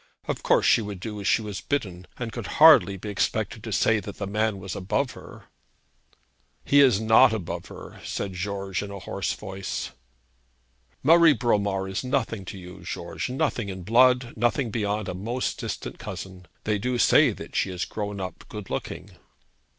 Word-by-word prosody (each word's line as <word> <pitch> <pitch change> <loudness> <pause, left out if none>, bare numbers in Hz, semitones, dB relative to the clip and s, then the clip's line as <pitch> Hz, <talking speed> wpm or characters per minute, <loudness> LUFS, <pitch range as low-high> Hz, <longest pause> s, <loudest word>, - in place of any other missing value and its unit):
Of - - -2
course, - - +3
she - - +5
would 105 -3 -6
do 105 +2 -6
as 100 - -3
she 115 - +3
was 105 -2 -5
bidden, 95 -11 -3
and 120 -2 -4
could 115 -3 -6
hardly 130 - +7
be 105 +3 -7
expected 100 - -1
to - - -6
say 115 -1 +3
that 100 -1 -8
the 100 - -3
man 105 +1 0
was 95 -1 -6
above 130 +8 -1
her.' - - -12 1.2
'He 145 - +5
is 125 -8 +5
not 110 0 +6
above 100 -7 -4
her,' - - -11
said 100 -2 -4
George 95 +1 -3
in 100 - -6
a 100 - -7
hoarse - - -3
voice. 95 -7 -5 1.1
'Marie 165 +2 +7
Bromar 100 -5 0
is 95 +5 -3
nothing 125 -6 -1
to 95 - -7
you, 90 -1 -11
George; - - -5
nothing 125 -5 -1
in 95 -1 -6
blood; 125 +3 +4
nothing 120 +1 0
beyond 105 -2 -1
a - - -3
most 115 +7 -3
distant - - -5
cousin. 95 -2 -8 0.2
They 105 -1 0
do 125 +3 -1
say - - +5
that - - -10
she - - +1
has 90 0 -3
grown 105 -1 -5
up 95 -1 -6
good 105 -3 -8
looking.' - - -5
105 Hz, 180 wpm, -25 LUFS, 95-120 Hz, 1.2 s, hardly